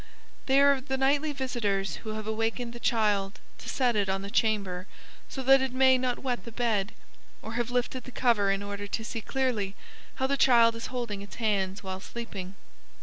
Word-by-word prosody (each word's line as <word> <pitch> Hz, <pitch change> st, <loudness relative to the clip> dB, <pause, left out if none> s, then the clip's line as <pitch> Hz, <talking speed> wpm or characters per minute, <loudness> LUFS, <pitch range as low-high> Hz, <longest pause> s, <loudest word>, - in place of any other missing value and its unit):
They 270 Hz, +1 st, +5 dB
are 280 Hz, -1 st, +5 dB
the 265 Hz, 0 st, -2 dB
nightly 285 Hz, +3 st, +2 dB
visitors 230 Hz, -8 st, -1 dB
who 215 Hz, -1 st, -6 dB
have 215 Hz, -1 st, -5 dB
awakened 225 Hz, +2 st, -2 dB
the 240 Hz, -, -8 dB
child 210 Hz, -5 st, +1 dB, 0.2 s
to -, -, -8 dB
set 250 Hz, -3 st, +1 dB
it 200 Hz, -2 st, +1 dB
on 195 Hz, 0 st, -1 dB
the 200 Hz, -, -6 dB
chamber 200 Hz, -5 st, 0 dB, 0.4 s
so 265 Hz, -, -5 dB
that 270 Hz, +1 st, +6 dB
it 265 Hz, -1 st, -2 dB
may 260 Hz, 0 st, +5 dB
not 250 Hz, -1 st, 0 dB
wet 250 Hz, -2 st, -3 dB
the 230 Hz, -, -9 dB
bed, 220 Hz, -3 st, 0 dB, 0.5 s
or 220 Hz, -, -6 dB
have 240 Hz, 0 st, -1 dB
lifted 245 Hz, 0 st, -1 dB
the 255 Hz, -, -9 dB
cover 230 Hz, -5 st, +2 dB
in 195 Hz, +1 st, 0 dB
order 205 Hz, 0 st, -5 dB
to 225 Hz, +2 st, -3 dB
see 225 Hz, 0 st, -4 dB
clearly 220 Hz, -6 st, -1 dB, 0.4 s
how 265 Hz, -, 0 dB
the 280 Hz, +1 st, +1 dB
child 235 Hz, -3 st, +5 dB
is 230 Hz, -, -5 dB
holding 235 Hz, -6 st, -4 dB
its 200 Hz, -, -10 dB
hands 200 Hz, -3 st, -1 dB
while 190 Hz, -1 st, -5 dB
sleeping. 195 Hz, -3 st, -7 dB
230 Hz, 200 wpm, -28 LUFS, 200-255 Hz, 0.5 s, that